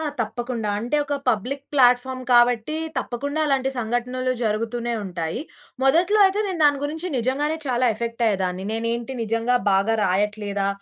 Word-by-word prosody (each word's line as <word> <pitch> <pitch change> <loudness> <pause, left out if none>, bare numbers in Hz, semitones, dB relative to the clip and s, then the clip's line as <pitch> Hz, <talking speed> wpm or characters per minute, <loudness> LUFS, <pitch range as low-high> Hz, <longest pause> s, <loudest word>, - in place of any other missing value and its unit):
ఆ! - - -3 0.2
తప్పకుండ. 235 +1 -3
అంటే, 240 +7 -1
ఒక 285 0 -2
పబ్లిక్ 250 +5 -1
ప్లాట్‌ఫార్మ్ 255 -1 +3
కాబట్టి, 240 +4 +4 0.2
తప్పకుండా 285 +5 -3
అలాంటి 270 -2 +1
సంఘటనలు 245 +2 -1
జరుగుతూనే 230 +2 -1
ఉంటాయి. 170 -4 -4 0.4
మొదట్లో 345 +10 +4
అయితే 390 +2 0
నేను 360 -4 -4
దాని 285 -1 +3
గురించి 320 +5 -4
నిజంగానే 280 +6 0
చాలా 250 -1 +2
ఎఫెక్ట్ 230 +2 -4
అయ్యేదాన్ని. 190 -3 -1
నేనేంటి 230 +3 -2
నిజంగా 230 +2 +1 0.2
బాగా 200 +4 +2
రాయట్లేదా? 200 +1 0
240 Hz, 140 wpm, -23 LUFS, 220-270 Hz, 0.4 s, కాబట్టి